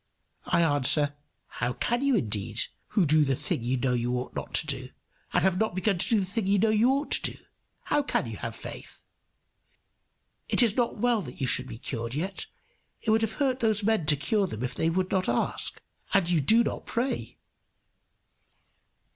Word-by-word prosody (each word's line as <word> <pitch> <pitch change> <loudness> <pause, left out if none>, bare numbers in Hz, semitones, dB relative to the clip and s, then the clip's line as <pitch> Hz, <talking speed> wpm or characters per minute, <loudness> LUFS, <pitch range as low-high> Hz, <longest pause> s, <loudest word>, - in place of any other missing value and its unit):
I 170 - +3
answer, 145 -1 +4 0.3
"How 125 0 -3
can 240 - -1
you 275 -2 +3
indeed, 110 - -1 0.2
who 200 -6 +2
do 155 +1 +4
the 135 -2 +1
thing 120 - -2
you 125 +2 0
know 125 0 0
you 120 0 0
ought 125 0 -5
not - - -5
to - - +3
do, - - -2 0.4
and - - +2
have 190 -1 +2
not 220 -5 0
begun 190 0 +1
to - - 0
do 225 -3 +3
the - - -2
thing 200 +2 -3
you 200 +1 +3
know 215 +3 +3
you 220 +3 +4
ought 280 +2 0
to - - +1
do? - - -15 0.5
How 295 - +1
should - - 0
you - - -6
have - - -5
faith? - - -9 1.4
It - - +4
is 225 -4 +2
not 240 -2 0
well 235 0 +2
that 125 -8 -10
you 135 - 0
should 125 0 +2
be 115 - -8
cured 115 +1 -5
yet. 185 +6 -3 0.6
It 220 - +1
would 220 +1 +3
have 225 -1 -1
hurt 265 -3 0
these 220 -3 +1
men 215 -7 +1
to 150 - +4
cure 195 +9 0
them 110 - -5
if 125 +1 -2
they 160 - 0
would 185 +2 -1
not 185 -6 +1
ask. 120 - -1 0.4
And 195 -3 +3
you 170 -3 +2
do 225 - +5
not - - -4
pray." 250 +3 -2
185 Hz, 205 wpm, -27 LUFS, 130-220 Hz, 1.4 s, do